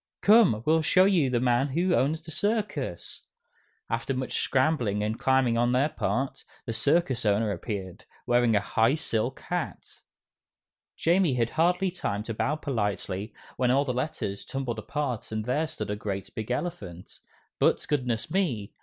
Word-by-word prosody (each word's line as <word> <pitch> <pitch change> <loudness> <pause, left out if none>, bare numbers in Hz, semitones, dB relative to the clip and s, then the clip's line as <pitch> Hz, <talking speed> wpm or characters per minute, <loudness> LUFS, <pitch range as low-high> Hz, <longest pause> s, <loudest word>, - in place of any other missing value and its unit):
"Come, 200 - +5
we'll 160 +1 +4
show 185 +4 +4
you 175 -9 +3
the 125 -1 +1
man 125 +2 +2
who 175 +6 +1
owns 155 +3 +1
the 160 - -9
circus!" 185 - -2 0.7
After 115 +3 -2
much 130 0 -3
scrambling 130 -7 +1
and 110 +2 -2
climbing 130 -3 +2
on 120 +1 +2
their 135 +4 +3
part, 135 -2 -2 0.2
the 115 - -3
circus 140 +2 +1
owner 105 0 +2
appeared, 95 -1 -5 0.2
wearing 120 -2 +3
a - - +5
high 115 +6 +2
silk 115 -8 -2
hat. - - -5 1.0
Jamie 170 -4 +2
had 115 -2 0
hardly 180 +3 +2
time 105 - -3
to 115 - -4
bow 145 +7 0
politely, 105 - -3 0.2
when 125 -1 +2
all 135 +3 +3
the 130 - -1
letters 125 -7 -3
tumbled 125 -4 -4
apart 125 -2 -3
and 110 -1 -3
there 150 +6 0
stood 155 -9 -5
a - - -1
great, 100 -2 -5
big 110 0 -5
elephant. 120 - -5 0.4
But, - - +2
goodness 125 -6 -1
me! 135 - -1
125 Hz, 160 wpm, -27 LUFS, 110-155 Hz, 1.0 s, Come